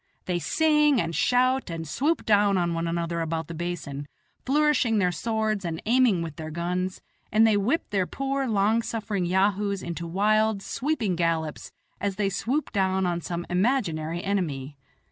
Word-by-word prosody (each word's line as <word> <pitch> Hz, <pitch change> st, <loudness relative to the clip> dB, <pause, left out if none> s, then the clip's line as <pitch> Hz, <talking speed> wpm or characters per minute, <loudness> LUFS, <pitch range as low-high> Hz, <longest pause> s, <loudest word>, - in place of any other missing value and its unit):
They 180 Hz, -1 st, -1 dB
sing 300 Hz, -, +3 dB
and 165 Hz, -3 st, -2 dB
shout 255 Hz, -1 st, +2 dB
and 165 Hz, -1 st, -5 dB
swoop 295 Hz, -, 0 dB
down 205 Hz, -2 st, +4 dB
on 170 Hz, -1 st, 0 dB
one 165 Hz, 0 st, -2 dB
another 170 Hz, 0 st, -2 dB
about 165 Hz, -1 st, -2 dB
the 170 Hz, -, -6 dB
basin, 160 Hz, -4 st, -5 dB, 0.4 s
flourishing 275 Hz, -5 st, +3 dB
their 180 Hz, -3 st, +2 dB
swords 220 Hz, +2 st, -1 dB
and 165 Hz, -2 st, -3 dB
aiming 230 Hz, -6 st, +3 dB
with 160 Hz, -3 st, -7 dB
their 155 Hz, 0 st, -6 dB
guns, 180 Hz, +3 st, -3 dB, 0.3 s
and 220 Hz, +1 st, +5 dB
they 220 Hz, -2 st, +4 dB
whip 225 Hz, +11 st, 0 dB
their 190 Hz, -3 st, +1 dB
poor, 275 Hz, 0 st, -2 dB
long 215 Hz, +1 st, +2 dB
suffering 210 Hz, -5 st, -2 dB
yahoos 200 Hz, +1 st, +1 dB
into 170 Hz, 0 st, -5 dB
wild, 210 Hz, +3 st, +2 dB
sweeping 245 Hz, -, -1 dB
gallops 165 Hz, -2 st, -1 dB, 0.3 s
as 200 Hz, -1 st, -2 dB
they 200 Hz, -1 st, 0 dB
swoop 255 Hz, +10 st, -2 dB
down 190 Hz, -1 st, +1 dB
on 175 Hz, -1 st, -1 dB
some 175 Hz, +1 st, -4 dB
imaginary 175 Hz, -, 0 dB
enemy. 150 Hz, -9 st, -2 dB
195 Hz, 165 wpm, -26 LUFS, 170-225 Hz, 0.4 s, and